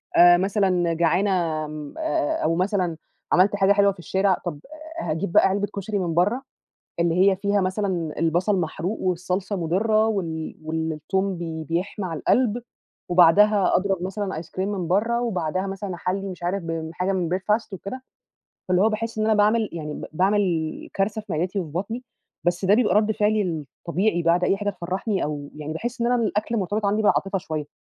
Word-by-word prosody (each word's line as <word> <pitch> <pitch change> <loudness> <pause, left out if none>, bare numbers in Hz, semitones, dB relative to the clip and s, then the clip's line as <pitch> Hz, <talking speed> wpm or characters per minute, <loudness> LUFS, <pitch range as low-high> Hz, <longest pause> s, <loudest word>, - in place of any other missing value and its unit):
آآ 175 0 +8
مثلًا 185 -3 +1
جعانة 170 +4 +2 0.4
م 150 -1 -7
آآ - - -5 0.4
آآ - - -2
أو 165 +1 +2
مثلًا 180 -2 0 0.3
عملت 190 +3 +4
حاجة 200 0 +4
حلوة 200 0 +4
في 190 - -13
الشارع، 190 +2 +1
طَب 150 -4 -4 0.4
آآ 165 - -2
هاجيب 170 +3 -2
بقى - - +6
علبة 200 +1 0
كشري 200 +1 -2
من 175 -3 -1
برّه 205 +10 +2 0.6
اللي 170 0 +2
هي 190 - +2
فيها 200 +1 +1
مثلًا 185 -5 -2
البَصَل 175 +5 +2
محروق 175 +5 -3
والصلصة 185 +2 -1
مُضِرّة 210 +6 +2
وال 165 -7 -3
والتوم 160 +4 -2
بي 160 -2 -5
بيحمى 175 +5 -3
على 165 -4 -4
القَلْب، 240 - +2 0.5
وبعدها 190 +4 +5
أضرب 190 -1 -1
مثلًا 190 -3 -3
ice 165 - -12
cream 175 - -11
من 190 -5 -3
برّه 225 +6 +1
وبعدها 185 -4 -1
مثلًا 195 -1 -5
أحلّي 195 +3 -2
مش 175 -1 -9
عارف 185 +2 -1
ب 165 -1 -4
حاجة 180 +2 -1
من 180 -3 -1
breakfast 210 +3 0
وكده، 225 +8 -6 0.7
فاللي 180 +1 +3
هو 215 - +5
باحس 225 +1 -3
إن 215 - +1
أنا 220 0 +3
باعمل 215 +1 +3
يعني 150 -3 -5
ب - - -6
باعمل 180 -3 0
كارثة 205 +2 0
في 215 - -8
معدتي 180 +5 -1
وفي 160 -5 -6
بطني، 220 +9 -4 0.4
بس 175 +2 0
ده 195 +2 +5
بيبقى 230 -1 +3
رَد 215 +1 +3
فعلي 210 +1 +2
الطبيعي 170 - -2
بعد 170 +2 +3
أي 195 - +2
حاجة 205 +1 -1
تفرّحني 190 +3 -2
أو 145 -1 -5
يعني 150 0 -5
باحس 235 +9 -4
إن 235 - +2
أنا 245 +1 +3
الأكل 215 +2 -1
مرتبط 205 +1 -1
عندي 210 +2 +1
بالعاطفة 195 -1 +2
شوية. 155 -4 -4
190 Hz, 185 wpm, -24 LUFS, 170-205 Hz, 0.7 s, آآ